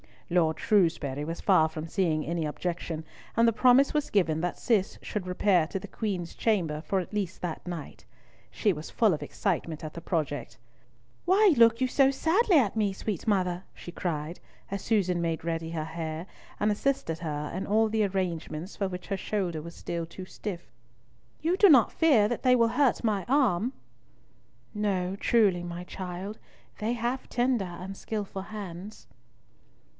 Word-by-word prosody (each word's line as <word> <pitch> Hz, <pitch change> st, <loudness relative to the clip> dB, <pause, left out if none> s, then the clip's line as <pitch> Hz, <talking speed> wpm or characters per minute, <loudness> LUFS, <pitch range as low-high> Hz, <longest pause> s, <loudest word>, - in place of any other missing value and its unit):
Lord 160 Hz, -3 st, +2 dB
Shrewsbury 160 Hz, -8 st, +1 dB
was 165 Hz, +2 st, -5 dB
far 185 Hz, -5 st, +5 dB
from 160 Hz, 0 st, -6 dB
seeing 165 Hz, -3 st, 0 dB
any 170 Hz, 0 st, -1 dB
objection, 165 Hz, +1 st, -3 dB, 0.3 s
and 230 Hz, 0 st, +5 dB
the 230 Hz, -, +4 dB
promise 255 Hz, +4 st, +5 dB
was 300 Hz, -1 st, 0 dB
given 165 Hz, -6 st, +2 dB
that 175 Hz, 0 st, -2 dB
Cis 210 Hz, -5 st, +1 dB
should 200 Hz, -4 st, -4 dB
repair 180 Hz, -2 st, +3 dB
to 195 Hz, -, -3 dB
the 200 Hz, +1 st, -8 dB
Queen's 190 Hz, -7 st, -3 dB
chamber 170 Hz, -9 st, 0 dB
for 190 Hz, +4 st, 0 dB
at 180 Hz, -, -10 dB
least 195 Hz, -4 st, -3 dB
that 175 Hz, 0 st, -5 dB
night. 170 Hz, -4 st, -7 dB, 0.4 s
She 210 Hz, -, +1 dB
was 155 Hz, 0 st, -7 dB
full 220 Hz, -5 st, +3 dB
of 150 Hz, -, -3 dB
excitement 165 Hz, -6 st, -2 dB
at 155 Hz, -, -6 dB
the 170 Hz, -, -7 dB
prospect. 145 Hz, -7 st, -2 dB, 0.7 s
"Why 385 Hz, +1 st, +5 dB
look 230 Hz, +1 st, +6 dB
you 260 Hz, -, +3 dB
so 270 Hz, +1 st, +4 dB
sadly 345 Hz, -, +3 dB
at 225 Hz, -5 st, +2 dB
me, 205 Hz, -3 st, +1 dB
sweet 205 Hz, +1 st, -4 dB
mother?" 185 Hz, -3 st, +1 dB
she 175 Hz, -, -9 dB
cried, 165 Hz, -1 st, -3 dB, 0.3 s
as 200 Hz, -, -3 dB
Susan 185 Hz, -6 st, +1 dB
made 165 Hz, -2 st, -1 dB
ready 165 Hz, -1 st, -2 dB
her 160 Hz, -2 st, -2 dB
hair, 160 Hz, +1 st, -5 dB, 0.4 s
and 210 Hz, +1 st, +3 dB
assisted 205 Hz, -7 st, -1 dB
her 150 Hz, -3 st, -4 dB
in 185 Hz, -, -3 dB
all 220 Hz, +2 st, +3 dB
the 215 Hz, -1 st, +2 dB
arrangements 180 Hz, -2 st, -3 dB
for 200 Hz, -, 0 dB
which 180 Hz, -1 st, -7 dB
her 195 Hz, -, -1 dB
shoulder 185 Hz, -7 st, -2 dB
was 170 Hz, +2 st, -9 dB
still 170 Hz, -1 st, -4 dB
too 185 Hz, +3 st, -9 dB
stiff; 185 Hz, -1 st, -7 dB, 0.7 s
"you 340 Hz, +4 st, +1 dB
do 405 Hz, -, +7 dB
not 260 Hz, -8 st, +6 dB
fear 260 Hz, -11 st, +4 dB
that 240 Hz, -, -2 dB
they 255 Hz, -1 st, +5 dB
will 230 Hz, -2 st, +4 dB
hurt 270 Hz, 0 st, +2 dB
my 210 Hz, -4 st, 0 dB
arm?" 250 Hz, -4 st, +2 dB, 1.0 s
"No, 195 Hz, -3 st, -1 dB
truly, 200 Hz, -6 st, +3 dB
my 175 Hz, 0 st, -6 dB
child. 185 Hz, +3 st, -6 dB, 0.4 s
They 220 Hz, +3 st, 0 dB
have 245 Hz, +2 st, -2 dB
tender 245 Hz, -4 st, +1 dB
and 180 Hz, +2 st, -7 dB
skilful 200 Hz, -3 st, -4 dB
hands." 200 Hz, -1 st, -8 dB
190 Hz, 170 wpm, -28 LUFS, 170-220 Hz, 1.0 s, do